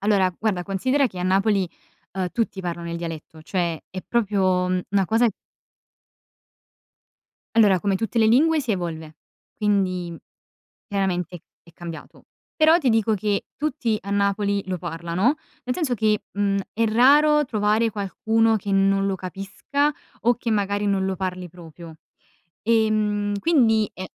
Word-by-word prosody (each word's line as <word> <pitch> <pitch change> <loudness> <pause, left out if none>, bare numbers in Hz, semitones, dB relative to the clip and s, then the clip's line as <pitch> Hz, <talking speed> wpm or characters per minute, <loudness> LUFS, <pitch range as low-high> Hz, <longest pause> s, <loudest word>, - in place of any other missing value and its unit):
Allora, 195 -3 +2
guarda 200 -5 -1
considera 255 +9 +1
che 185 -6 -9
a - - -3
Napoli, 195 0 +2 0.4
uhm, 185 -1 -2
tutti 225 -4 -2
parlano 170 -1 -5
il 170 - -3
dialetto; 160 -2 -7
cioè 170 -3 -2
è 185 - -6
proprio, 190 -5 +1
mhmm, 185 0 0
una 195 -1 +2
cosa 230 +2 +3 2.3
Allora 200 -5 +5
come 195 0 +1
tutte 225 +3 -2
le 220 - +5
lingue 305 +7 +4
si 255 -5 -4
evolve, 160 -4 -5 0.4
quindi 185 -5 0 0.7
chiaramente 180 -3 -2 0.2
è 170 - -19
cambiato. 170 -1 -10 0.3
Però 315 +1 +6
ti 285 -7 0
dico 220 -1 +2
che 205 0 -1
tutti 255 -7 -1
a 200 - -7
Napoli 200 0 +1
lo 185 -1 -3
parlano, 170 - -1 0.3
nel 250 - -2
senso 305 -8 -1
che, 215 -1 +1
mhmm, 200 -1 0
è 230 +1 +1
raro 295 +7 +5
trovare 220 -1 +1
qualcuno 220 +2 +1
che 200 0 -4
non 195 0 +3
lo 195 - 0
capisca 195 - -2 0.3
o 240 +1 +4
che 240 0 -4
magari 205 -1 0
non 195 -1 +1
lo 190 - -1
parli 185 -1 -4
proprio. 165 -1 -12 0.7
Ehm, 215 -2 +1
quindi 225 -8 +3
è 185 - -6
200 Hz, 145 wpm, -23 LUFS, 185-225 Hz, 2.3 s, Però